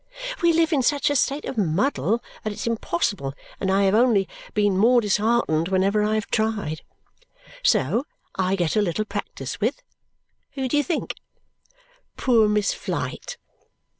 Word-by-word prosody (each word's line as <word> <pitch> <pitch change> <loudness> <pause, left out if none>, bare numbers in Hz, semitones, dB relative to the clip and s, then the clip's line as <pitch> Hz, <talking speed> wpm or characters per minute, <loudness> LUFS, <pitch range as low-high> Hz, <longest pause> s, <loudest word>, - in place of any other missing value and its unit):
We 340 -1 +5
live 330 0 +2
in 280 - +3
such 290 +3 +2
a - - 0
state 280 +2 +1
of 235 - -3
muddle 210 - +1 0.2
that 215 - -2
it's 205 - -5
impossible, 200 -9 -1 0.2
and 190 - -1
I 195 +1 +3
have 195 0 +3
only 220 -4 +4 0.3
been 205 -2 +2
more 235 +6 +5
disheartened 210 -6 +1
whenever 195 +3 +2
I 210 +1 +1
have 215 - -1
tried. 210 -8 -1 0.8
So 400 - +2 0.3
I 190 0 0
get 175 -1 0
a 215 - +4
little 205 +2 -1
practice 200 - -6
with 235 +7 -1 0.7
who 265 -2 -2
do 255 - -1
you 290 - +3
think? 335 -1 -2 1.0
Poor 230 -5 +4
Miss 210 -1 +1
Flite! - - -4
215 Hz, 155 wpm, -24 LUFS, 195-250 Hz, 1.0 s, We